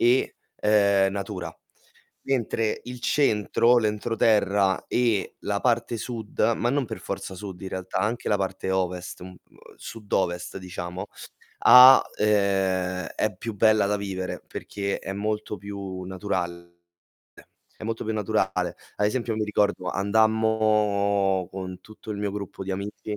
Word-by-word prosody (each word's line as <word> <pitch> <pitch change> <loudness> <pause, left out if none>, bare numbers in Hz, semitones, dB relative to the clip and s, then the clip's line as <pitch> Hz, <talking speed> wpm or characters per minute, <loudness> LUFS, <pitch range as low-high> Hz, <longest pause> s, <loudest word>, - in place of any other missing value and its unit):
E, 125 +2 +3 0.3
uhm, 100 -2 +4
natura. 95 -4 -5 0.7
Mentre 115 -4 -1
il 125 0 -8
centro, 120 -2 +3
l'entroterra, 105 -3 +1
e 115 -5 0
la 100 0 -1
parte 120 -1 +1
sud, 115 -1 -7 0.2
ma 120 - 0
non 140 +1 +1
per - - -7
forza - - -5
sud 95 -1 -8
in 95 - -4
realtà, 95 0 -4
anche 110 +5 -1
la 105 - +3
parte 95 -1 -3
ovest, 90 -1 -2
m 90 - -7
uhm, 90 -1 -12 0.4
sud-ovest 95 -5 -3
diciamo, 90 +1 -6 0.5
ha 130 +1 +9 0.2
uhm, - - +1 0.9
è 110 -2 -1
più 115 0 -5
bella 110 -1 +4
da 105 - +1
vivere 95 -2 -4
perché 100 -1 -4
è 95 - -6
molto 105 +1 -3
più 100 -1 -7
naturale, 90 -2 -4 1.0
È - - -9
molto 115 0 -3
più 110 - -2
naturale. 95 -4 -1 0.2
Ad 105 - +2
esempio 115 +1 -1
mi 110 - 0
ricordo 105 -3 0
andammo 105 -2 +2
con 95 -1 -7
tutto 110 +2 -12
il 105 - -4
mio 100 -1 -2
gruppo 100 -1 -6
di 95 - -5
amici 105 +2 -5
100 Hz, 140 wpm, -25 LUFS, 95-110 Hz, 1.0 s, ha